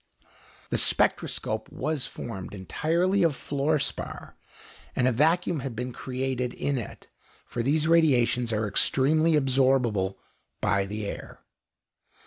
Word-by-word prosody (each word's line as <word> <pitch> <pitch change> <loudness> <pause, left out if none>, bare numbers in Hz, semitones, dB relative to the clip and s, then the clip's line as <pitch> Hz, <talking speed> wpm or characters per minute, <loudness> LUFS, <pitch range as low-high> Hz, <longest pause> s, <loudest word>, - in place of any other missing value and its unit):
The - - +2
spectroscope 110 0 +1
was 155 -4 -2
formed 105 -3 -7
entirely 170 - 0
of 165 -5 +3
fluor 145 +3 0
spar, 140 - -5 0.6
and 125 - +2
a - - +4
vacuum 160 +6 +2
had 130 -3 -5
been 125 +2 -4
created 125 -1 -3
in 140 -2 -1
it, 115 - -9 0.4
for 120 - -4
these 150 +5 +1
radiations 125 -8 +3
are 110 0 0
extremely 155 +10 +3
absorbable 130 -8 +2 0.4
by 100 0 +1
the 105 +1 -4
air. - - -7
130 Hz, 120 wpm, -27 LUFS, 115-155 Hz, 0.6 s, a